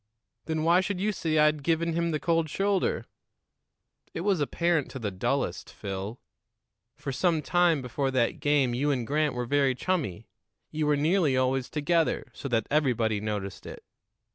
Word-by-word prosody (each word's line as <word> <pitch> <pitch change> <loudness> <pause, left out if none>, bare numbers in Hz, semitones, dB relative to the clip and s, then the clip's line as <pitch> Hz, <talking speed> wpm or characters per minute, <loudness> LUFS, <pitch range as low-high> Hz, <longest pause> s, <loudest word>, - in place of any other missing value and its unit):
"Then 160 -1 -1
why 170 +3 +5
should 190 -1 -3
you 210 +3 +1
say 160 -5 -1
I'd 150 0 +4
given 165 +2 0
him 170 +1 0
the 155 -2 -1
cold 165 -1 +1
shoulder?" 195 +3 0 1.1
"It 165 - -2
was 195 -2 +1
apparent 170 0 +1
to - - -7
the 110 -5 -3
dullest, 95 - -2
Phil. 100 +4 -6 0.8
For 135 - -5
some 160 +3 +1
time 175 -5 +2
before 135 +3 -1
that 130 -3 0
game 145 -4 +2
you 140 +5 0
and 130 -5 0
Grant 150 +1 0
were 125 0 -2
very 140 0 +2
chummy; 150 - -2 0.4
you 155 -1 -1
were 150 -1 +3
nearly 155 -2 +2
always 130 0 +1
together, 160 +2 0
so - - -6
that 115 -4 0
everybody 120 -8 +1
noticed 105 -2 -4
it. - - -9
150 Hz, 165 wpm, -28 LUFS, 125-165 Hz, 1.1 s, why